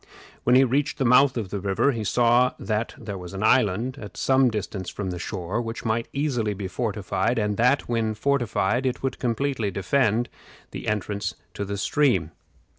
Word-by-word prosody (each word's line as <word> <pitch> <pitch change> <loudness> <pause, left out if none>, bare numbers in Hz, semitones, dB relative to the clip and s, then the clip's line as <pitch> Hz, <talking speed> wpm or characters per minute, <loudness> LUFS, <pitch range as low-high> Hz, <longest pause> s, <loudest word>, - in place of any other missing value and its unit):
When 125 - +5
he 130 - +7
reached 135 +3 0
the 135 - 0
mouth 125 +2 +5
of 105 -5 -4
the 100 - -2
river, 100 +8 +1
he 115 -4 -3
saw 120 +4 +3
that, 110 +1 -2
there 100 -3 -6
was 90 +1 -9
an 95 - -3
island, 120 +4 +2
at 105 - -9
some 130 -1 +3
distance 100 -4 -4
from 95 -3 -4
the 90 - -5
shore, 95 +4 -3
which 115 +1 -6
might 115 +1 0
easily 125 -8 -1
be 95 -1 -4
fortified, 105 +1 -1
and 105 -2 0
that, 125 +4 +3
when 115 -2 0
fortified, 120 -1 +1
it 130 +1 -3
would 135 - -2
completely 125 -2 -1
defend 110 +4 +1 0.4
the - - -7
entrance 100 -3 -2 0.2
to 100 - -4
the 100 +1 -4
stream. 100 - +1
115 Hz, 185 wpm, -25 LUFS, 100-125 Hz, 0.4 s, he